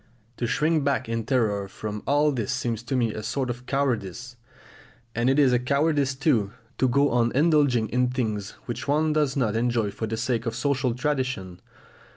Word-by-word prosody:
To 120 Hz, -, -1 dB
shrink 150 Hz, +5 st, +1 dB
back 140 Hz, -4 st, 0 dB
in 115 Hz, -1 st, -2 dB
terror 105 Hz, -7 st, +1 dB
from 105 Hz, +1 st, -6 dB
all 145 Hz, +2 st, +3 dB
this 120 Hz, -6 st, -2 dB
seems 120 Hz, -3 st, -2 dB
to 120 Hz, +3 st, -3 dB
me 115 Hz, -4 st, +1 dB
a 110 Hz, -, -5 dB
sort 130 Hz, +2 st, -2 dB
of 125 Hz, +1 st, -9 dB
cowardice; 125 Hz, -3 st, -2 dB, 0.8 s
and 120 Hz, +2 st, +1 dB
it 135 Hz, -, +2 dB
is 135 Hz, -4 st, +5 dB
a 125 Hz, -, +3 dB
cowardice 140 Hz, +1 st, +1 dB
too 120 Hz, -, +1 dB, 0.3 s
to 130 Hz, -, +4 dB
go 140 Hz, +3 st, +3 dB
on 120 Hz, -1 st, +2 dB
indulging 145 Hz, -6 st, +3 dB
in 125 Hz, +1 st, +2 dB
things 110 Hz, -5 st, -3 dB
which 120 Hz, -, -5 dB
one 155 Hz, +2 st, +2 dB
does 150 Hz, -3 st, +1 dB
not 115 Hz, -5 st, +1 dB
enjoy 115 Hz, -3 st, +1 dB
for 110 Hz, +2 st, -4 dB
the 110 Hz, +1 st, -3 dB
sake 120 Hz, 0 st, -1 dB
of 115 Hz, -, -2 dB
social 130 Hz, -1 st, 0 dB
tradition. 130 Hz, -10 st, -2 dB
125 Hz, 190 wpm, -25 LUFS, 115-140 Hz, 0.8 s, is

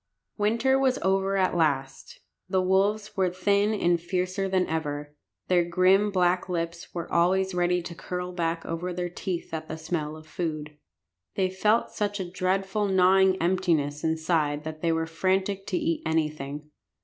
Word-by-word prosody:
Winter 230 Hz, +6 st, +2 dB
was 265 Hz, -1 st, +2 dB
over 195 Hz, +1 st, +1 dB
at 185 Hz, -2 st, +1 dB
last. 140 Hz, -5 st, -1 dB, 0.3 s
The 190 Hz, 0 st, +2 dB
wolves 200 Hz, +3 st, +1 dB
were 190 Hz, -2 st, +2 dB
thin 200 Hz, +3 st, +1 dB
and 175 Hz, -4 st, +2 dB
fiercer 185 Hz, +2 st, -1 dB
than 185 Hz, -1 st, +2 dB
ever. 150 Hz, -2 st, -4 dB, 0.3 s
Their 180 Hz, -1 st, +4 dB
grim 185 Hz, +4 st, +3 dB
black 180 Hz, -1 st, +1 dB
lips 170 Hz, -1 st, -3 dB
were 170 Hz, -2 st, -6 dB
always 190 Hz, +2 st, +2 dB
ready 180 Hz, 0 st, +1 dB
to 170 Hz, -, -7 dB
curl 180 Hz, +1 st, -5 dB
back 165 Hz, -2 st, -2 dB
over 170 Hz, +2 st, -3 dB
their 175 Hz, 0 st, -3 dB
teeth 180 Hz, -2 st, -4 dB
at 160 Hz, 0 st, -4 dB
the 160 Hz, -, -5 dB
smell 155 Hz, -1 st, -3 dB
of 155 Hz, -, -13 dB
food. 155 Hz, -2 st, -4 dB, 0.6 s
They 185 Hz, -1 st, +1 dB
felt 210 Hz, +4 st, +2 dB
such 205 Hz, -1 st, -2 dB
a 185 Hz, -, -3 dB
dreadful 190 Hz, +3 st, 0 dB
gnawing 190 Hz, 0 st, +4 dB
emptiness 165 Hz, -5 st, 0 dB
inside 160 Hz, -2 st, 0 dB
that 155 Hz, 0 st, -7 dB
they 170 Hz, -, +2 dB
were 165 Hz, 0 st, 0 dB
frantic 190 Hz, +4 st, -1 dB
to -, -, 0 dB
eat 325 Hz, -1 st, -1 dB
anything. 150 Hz, -2 st, -2 dB
180 Hz, 160 wpm, -27 LUFS, 160-190 Hz, 0.6 s, Their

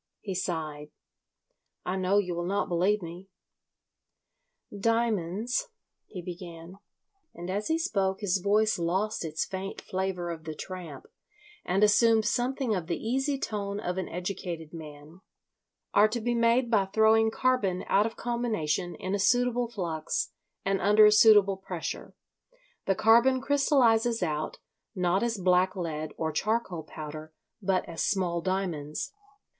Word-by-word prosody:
He 195 Hz, -, -5 dB
sighed. 155 Hz, -5 st, -3 dB, 1.0 s
"I 180 Hz, -, -1 dB
know 190 Hz, +1 st, +1 dB
you 185 Hz, -3 st, +1 dB
will 175 Hz, 0 st, -3 dB
not 200 Hz, +2 st, 0 dB
believe 185 Hz, +4 st, +1 dB
me." 175 Hz, +3 st, -9 dB, 1.5 s
"Diamonds," 225 Hz, -, 0 dB, 0.4 s
he 180 Hz, -4 st, -8 dB
began—and 180 Hz, -, -11 dB
as 205 Hz, +2 st, -2 dB
he 320 Hz, -, +2 dB
spoke 195 Hz, -11 st, -1 dB
his 195 Hz, -2 st, +1 dB
voice 210 Hz, +1 st, +2 dB
lost 190 Hz, +6 st, -1 dB
its 160 Hz, -1 st, -2 dB
faint 195 Hz, +1 st, -5 dB
flavour 185 Hz, -2 st, -3 dB
of 160 Hz, -1 st, -8 dB
the 155 Hz, -1 st, -5 dB
tramp 175 Hz, -6 st, -8 dB, 0.6 s
and 190 Hz, +3 st, +1 dB
assumed 220 Hz, +1 st, +5 dB
something 245 Hz, +2 st, 0 dB
of 180 Hz, -5 st, -3 dB
the 170 Hz, -, -1 dB
easy 270 Hz, +5 st, -1 dB
tone 205 Hz, -4 st, -3 dB
of 180 Hz, -3 st, -3 dB
an 185 Hz, -, -4 dB
educated 175 Hz, -3 st, -5 dB
man—"are 160 Hz, +6 st, -3 dB
to 230 Hz, +3 st, -3 dB
be 240 Hz, +2 st, -1 dB
made 235 Hz, +1 st, +2 dB
by 205 Hz, -4 st, +4 dB
throwing 220 Hz, +2 st, +4 dB
carbon 220 Hz, -7 st, 0 dB
out 205 Hz, +3 st, +3 dB
of 225 Hz, -, -9 dB
combination 215 Hz, -9 st, -1 dB
in 185 Hz, -, -4 dB
a 200 Hz, -, 0 dB
suitable 245 Hz, +3 st, +2 dB
flux 170 Hz, -9 st, -3 dB, 0.3 s
and 195 Hz, 0 st, +1 dB
under 210 Hz, +2 st, +6 dB
a 210 Hz, -, +7 dB
suitable 210 Hz, -2 st, +6 dB
pressure; 180 Hz, -3 st, -6 dB, 0.7 s
the 195 Hz, -, +3 dB
carbon 235 Hz, +5 st, +5 dB
crystallises 250 Hz, -5 st, +3 dB
out, 155 Hz, -2 st, -2 dB, 0.4 s
not 180 Hz, +1 st, +1 dB
as 235 Hz, -2 st, 0 dB
black 185 Hz, +1 st, +2 dB
lead 155 Hz, -4 st, -4 dB
or 160 Hz, -1 st, -1 dB
charcoal 210 Hz, 0 st, -1 dB
powder, 155 Hz, 0 st, -8 dB, 0.3 s
but 190 Hz, -1 st, +1 dB
as 165 Hz, -1 st, -5 dB
small 180 Hz, -4 st, 0 dB
diamonds. 170 Hz, -, -3 dB
195 Hz, 140 wpm, -28 LUFS, 175-225 Hz, 1.5 s, a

